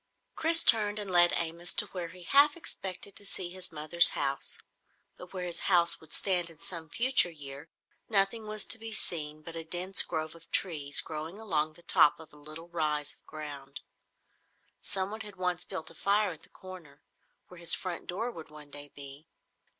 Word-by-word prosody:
Chris 330 +1 +7
turned 210 -2 +4
and 205 -2 -1
led 175 -1 +7
Amos 170 +1 -1
to - - +5
where 180 -3 -5
he 180 +1 -13
half 290 - +5
expected 195 - -6
to - - -3
see 185 -3 -2
his 185 -1 -5
mother's 160 +2 +6
house. 140 0 -3 0.6
But 180 - -12
where 185 -2 -5
his 170 -1 -2
house 170 -2 +3
would 160 - -17
stand 180 -3 +2
in 165 - -11
some 165 0 -7
future 245 - +2
year, 145 -1 -9 0.4
nothing 215 +1 +2
was 215 -1 -2
to 225 - +1
be 225 0 -7
seen 155 -6 -2
but 165 +1 -8
a 165 - -1
dense 180 +4 +3
grove 155 -2 -3
of 165 0 -17
trees 150 -6 -1
growing 160 +4 -7
along 155 -8 -1
the 175 - -17
top 150 -3 +5
of 160 -2 -14
a - - -16
little 155 +3 -8
rise 150 -3 -1
of - - -24
ground. 145 -3 -8 1.0
Someone 200 +3 -2
had 210 -2 -6
once 180 -1 -2
built 160 0 -4
a - - -11
fire 200 +3 +1
at 160 - -11
the - - -18
corner, 175 -7 -13 0.5
where 180 - -13
his 170 -1 +5
front 180 -3 -5
door 225 +7 -3
would 160 -6 -11
one 150 -1 -13
day 145 0 -7
be. 140 +2 -9
170 Hz, 190 wpm, -30 LUFS, 155-195 Hz, 1.0 s, Chris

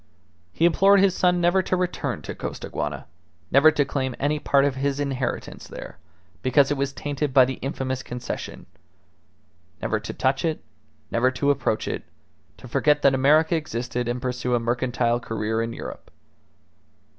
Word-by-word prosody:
He 165 - +1
implored 195 +4 +5
his 195 -1 +4
son 180 -1 +2
never 175 +2 +3
to 185 - -1
return 180 -1 -2
to - - -5
Costaguana, - - -5 0.5
never 140 +4 +7
to 145 -2 +1
claim 130 -2 -2
any 150 +2 0
part 140 -1 +3
of 140 - +1
his 140 +1 -1
inheritance 135 -3 -3
there, - - -9 0.4
because 135 +2 +3
it - - +2
was 140 0 -1
tainted 145 -1 -3
by 130 -2 +8
the 130 +1 -5
infamous 130 -1 -3
Concession; 125 -1 -6 1.1
never - - -1
to - - -6
touch 135 +1 0
it, 160 -2 -1 0.5
never 120 +2 +3
to 140 +2 +1
approach 115 -5 -1
it, - - -3 0.6
to - - -12
forget 150 0 +2
that 140 - +5
America 155 +5 +4
existed, 125 -5 -3
and 120 +1 -1
pursue 125 -1 -1
a - - +2
mercantile 120 0 0
career 110 -1 -2
in 115 0 -2
Europe. - - -8
135 Hz, 160 wpm, -24 LUFS, 125-150 Hz, 1.1 s, by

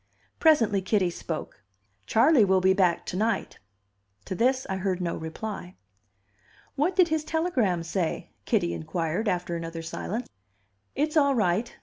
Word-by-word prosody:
Presently 230 - +4
Kitty 185 -2 +1
spoke. 165 - -6 0.5
"Charley 240 +2 +5
will 190 -1 +3
be 190 +1 +4
back 180 -3 +2
to - - -5
night." 220 +4 -1 0.7
To 190 - -4
this 255 +6 +1
I 190 - -2
heard 190 -1 -1
no 175 -2 -2
reply. 180 +3 -6 1.0
"What 310 +6 +1
did 365 -3 +5
his 315 -1 0
telegram 265 - 0
say?" 170 0 -3
Kitty 85 - +1
inquired, 165 - -2
after 180 -2 -2
another 165 0 -5
silence. 215 +8 -4 0.7
"It's 305 +2 0
all 280 -2 +4
right." 210 +2 0
195 Hz, 140 wpm, -27 LUFS, 175-255 Hz, 1.0 s, Charley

